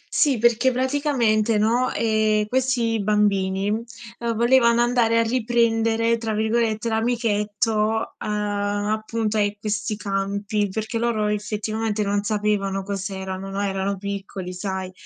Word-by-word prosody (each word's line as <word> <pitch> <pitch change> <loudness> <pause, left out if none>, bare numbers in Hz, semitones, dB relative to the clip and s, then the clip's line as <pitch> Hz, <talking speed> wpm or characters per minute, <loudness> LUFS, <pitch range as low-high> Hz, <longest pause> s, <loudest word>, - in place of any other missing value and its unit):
Sì, 280 -6 +3
perché 235 +3 +3
praticamente, 250 -5 +1
no, 235 +4 +2
ehm, 215 -1 +1
questi 240 -2 0
bambini, 200 -1 +1
uhm, 230 0 -5
volevano 235 0 +4
andare 240 -2 +2
a 230 - +4
"riprendere," 230 -1 +1
tra 225 -1 -2
virgolette, 220 0 0
l'amichetto 220 -1 0
a 205 0 -1
appunto, 220 0 -2
a 205 -1 +2
questi 210 +1 -2
campi, 200 +1 -1
perché 220 +3 -3
loro 230 -2 0
effettivamente 210 +1 -2
non 200 0 0
sapevano 205 -2 -1
cos'erano, 190 -1 -5
no. 195 +1 -4
Erano 195 0 -1
piccoli 195 -2 -5
sai. 190 0 -4
215 Hz, 120 wpm, -23 LUFS, 205-230 Hz, -, volevano